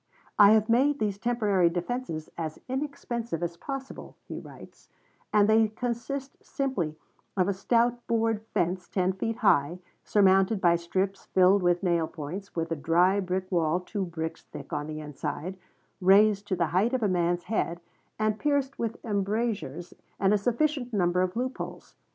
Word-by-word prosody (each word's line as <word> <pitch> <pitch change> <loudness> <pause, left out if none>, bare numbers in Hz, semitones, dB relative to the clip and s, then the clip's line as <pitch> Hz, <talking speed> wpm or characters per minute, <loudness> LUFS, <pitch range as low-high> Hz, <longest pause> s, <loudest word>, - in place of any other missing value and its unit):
"I 205 0 +9
have 220 -1 +3
made 270 +5 +3
these 205 -4 -2
temporary 205 -6 +2
defenses 175 -2 -4
as 160 -2 -4
inexpensive 245 - -3
as 170 0 -3
possible," 270 +7 -7
he - - -6
writes, - - -14 0.4
"and 205 -1 +4
they 220 0 +5
consist 245 +5 -5
simply 225 - -2 0.4
of 185 -1 +3
a 200 - +1
stout 235 +5 +1
board 225 -2 +1
fence 180 +1 -1
ten 185 -1 +1
feet 225 +4 -2
high, 145 -1 +4 0.3
surmounted 195 +1 +4
by 175 -2 +4
strips 185 +3 -2
filled 190 +2 +4
with 175 +1 +2
nail 170 -3 +2
points, 175 +8 -7
with 165 -1 -2
a - - +1
dry 175 +6 +3
brick 185 0 -3
wall 170 -1 +2
two 195 +2 -4
bricks 165 -2 -5
thick - - -10
on 150 0 -2
the 155 0 -5
inside, 155 +4 -5 0.5
raised 200 +2 +5
to 190 - 0
the 170 -1 +1
height 210 +8 +2
of 255 -3 0
a - - +3
man's 175 -1 +1
head, 175 -4 -1 0.4
and 215 0 0
pierced 280 -2 0
with 230 -1 -2
embrasures 200 - -2 0.3
and 195 +1 +3
a - - +4
sufficient 250 +3 0
number 180 -2 +2
of 185 0 -1
loop 255 +2 -2
holes. - - -7
195 Hz, 165 wpm, -28 LUFS, 175-230 Hz, 0.5 s, I